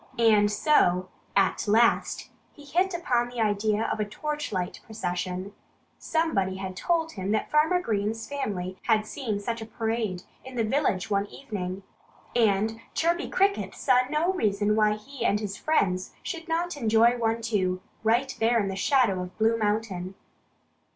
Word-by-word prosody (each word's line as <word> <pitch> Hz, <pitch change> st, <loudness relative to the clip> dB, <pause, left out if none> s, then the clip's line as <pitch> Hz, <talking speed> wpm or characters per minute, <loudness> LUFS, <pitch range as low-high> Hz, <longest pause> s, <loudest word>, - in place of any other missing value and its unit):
And 215 Hz, -3 st, +4 dB
so, 185 Hz, -, +3 dB, 0.3 s
at 195 Hz, +2 st, +2 dB
last, 230 Hz, +3 st, +2 dB, 0.2 s
he 290 Hz, -, -15 dB
hit 360 Hz, +6 st, +1 dB
upon 245 Hz, -8 st, 0 dB
the 245 Hz, -1 st, -7 dB
idea 210 Hz, 0 st, +1 dB
of -, -, -2 dB
a -, -, +2 dB
torchlight 210 Hz, -4 st, -3 dB
procession. 185 Hz, -2 st, -4 dB, 0.5 s
Somebody 255 Hz, -, 0 dB
had 190 Hz, -1 st, -5 dB
told 325 Hz, -, 0 dB
him 195 Hz, -4 st, -3 dB
that 215 Hz, -, -1 dB
Farmer 315 Hz, +4 st, +4 dB
Green's 220 Hz, -, -2 dB
family 190 Hz, -10 st, -4 dB
had 215 Hz, -2 st, +3 dB
seen 215 Hz, -3 st, -3 dB
such 230 Hz, +3 st, -3 dB
a -, -, -5 dB
parade 220 Hz, -5 st, -2 dB, 0.2 s
in 260 Hz, 0 st, -10 dB
the 230 Hz, -, +1 dB
village 220 Hz, -5 st, 0 dB
one 200 Hz, 0 st, +1 dB
evening. 195 Hz, -7 st, -6 dB, 0.5 s
And 220 Hz, 0 st, +2 dB
Chirpy 340 Hz, +2 st, +1 dB
Cricket 400 Hz, +1 st, +1 dB
saw 255 Hz, -2 st, +3 dB
no 315 Hz, +5 st, +1 dB
reason 210 Hz, -, +1 dB
why 215 Hz, -1 st, +4 dB
he 235 Hz, +4 st, -7 dB
and 210 Hz, -2 st, +2 dB
his 205 Hz, -2 st, -4 dB
friends 190 Hz, -11 st, 0 dB
should 335 Hz, -1 st, -5 dB
not 340 Hz, +1 st, -1 dB
enjoy 230 Hz, -2 st, +4 dB
one 225 Hz, 0 st, +1 dB
too, 190 Hz, -5 st, 0 dB, 0.2 s
right 240 Hz, +4 st, +2 dB
there 230 Hz, +1 st, +3 dB
in 200 Hz, -2 st, 0 dB
the 190 Hz, -, -3 dB
shadow 210 Hz, -3 st, +2 dB
of 180 Hz, 0 st, -8 dB
Blue 225 Hz, +1 st, +3 dB
Mountain. 205 Hz, -4 st, -2 dB
220 Hz, 155 wpm, -27 LUFS, 200-265 Hz, 0.5 s, And